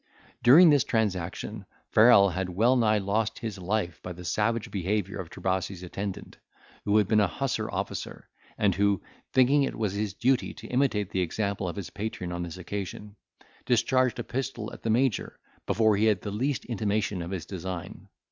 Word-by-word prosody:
During 155 +7 +8
this 145 -4 +4
transaction, 100 -1 -2 0.2
Farrel 105 -3 +7
had 90 +1 -3
well 115 +8 +3
nigh 110 -3 +3
lost 105 +3 -1
his 110 -5 -5
life 90 -3 -2
by 90 - -6
the 90 +1 -10
savage 110 +4 0
behaviour 95 0 -2
of 90 -3 -6
Trebasi's 95 0 -3
attendant, 95 +2 -6 0.5
who 105 +1 +3
had 105 -3 +3
been 110 +1 +3
a 105 - +4
hussar 85 - -2
officer, - - -5 0.3
and 100 -2 +2
who, 100 0 +1 0.3
thinking 130 +3 +4
it 135 - -1
was 105 -4 -1
his 100 -1 -3
duty 130 +4 +1
to - - -11
imitate 125 -7 +1
the 95 - 0
example 100 +2 -2
of - - -6
his 100 -5 -6
patron 100 -4 -5
on 85 0 -3
this 85 +1 -6
occasion, 100 +2 -6 0.5
discharged 125 0 +2
a 120 - -3
pistol 120 -3 -4
at - - -10
the 115 - -3
Major, 120 -1 +1 0.3
before 110 -1 +3
he 105 +2 +2
had 105 -4 +2
the 105 - -5
least 130 +6 -1
intimation 105 -4 -1
of 85 - -5
his 95 -4 -4
design. 90 -2 -6
105 Hz, 180 wpm, -27 LUFS, 95-115 Hz, 0.5 s, During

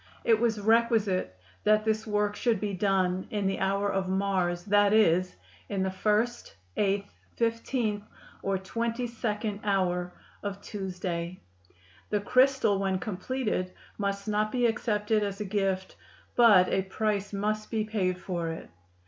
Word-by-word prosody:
It 225 -2 +4
was 225 -2 +1
requisite 215 - +2 0.3
that 215 0 +3
this 220 0 0
work 210 -1 0
should 230 -3 +1
be 205 -1 -2
done 185 -1 +1
in 205 -2 -2
the 195 - 0
hour 195 +1 +1
of 195 -2 -1
Mars, 185 -2 0
that 205 0 +4
is, 185 -4 +3 0.3
in 195 -2 -1
the 190 - -1
first, 215 - 0 0.2
eighth, 200 0 0 0.2
fifteenth 230 -2 0 0.4
or 195 0 0
twenty 230 +5 -2
second 215 -3 -3
hour 180 -3 0 0.3
of 200 -1 -4
Tuesday. 180 -3 -4 0.7
The 210 - +1
crystal 255 -2 +3
when 195 -1 0
completed 200 -1 -2 0.3
must 200 0 -2
not 215 0 +1
be 245 -1 +1
accepted 215 -2 +1
as 200 -1 -3
a 210 - -3
gift, 195 -2 -1 0.4
but 210 -7 +7
a - - +2
price 205 +1 -1
must 215 +1 -2
be 220 -2 0
paid 195 -4 -1
for 175 -2 -3
it. 165 - -7
205 Hz, 145 wpm, -28 LUFS, 190-220 Hz, 0.7 s, but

